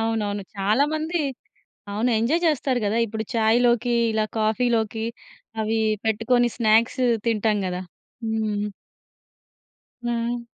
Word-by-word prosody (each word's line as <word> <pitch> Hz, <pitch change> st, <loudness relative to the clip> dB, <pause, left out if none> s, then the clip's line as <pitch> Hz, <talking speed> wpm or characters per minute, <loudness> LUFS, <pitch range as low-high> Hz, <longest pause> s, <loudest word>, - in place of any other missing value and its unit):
అవునవును. 215 Hz, -3 st, -1 dB
చాలా 210 Hz, +8 st, +3 dB
మంది 320 Hz, +2 st, -1 dB, 0.7 s
అవును. 220 Hz, +5 st, +1 dB
ఎంజాయ్ 260 Hz, +10 st, +1 dB
జెస్తారు 275 Hz, -5 st, +1 dB
గదా! 210 Hz, +3 st, +1 dB
ఇప్పుడు 220 Hz, 0 st, -4 dB
చాయ్‌లోకి 235 Hz, +2 st, +3 dB, 0.2 s
ఇలా 220 Hz, 0 st, +1 dB
కాఫీలోకి 220 Hz, 0 st, +1 dB, 0.6 s
అవి 220 Hz, +1 st, 0 dB, 0.3 s
పెట్టుకొని 225 Hz, +3 st, +2 dB
స్నాక్స్ 225 Hz, +2 st, +3 dB, 0.3 s
తింటాం 215 Hz, -2 st, +2 dB
గదా! 180 Hz, 0 st, -3 dB, 0.4 s
హ్మ్. 215 Hz, -2 st, -1 dB, 1.4 s
ఆ! 235 Hz, 0 st, -1 dB
225 Hz, 100 wpm, -24 LUFS, 215-240 Hz, 1.4 s, చాలా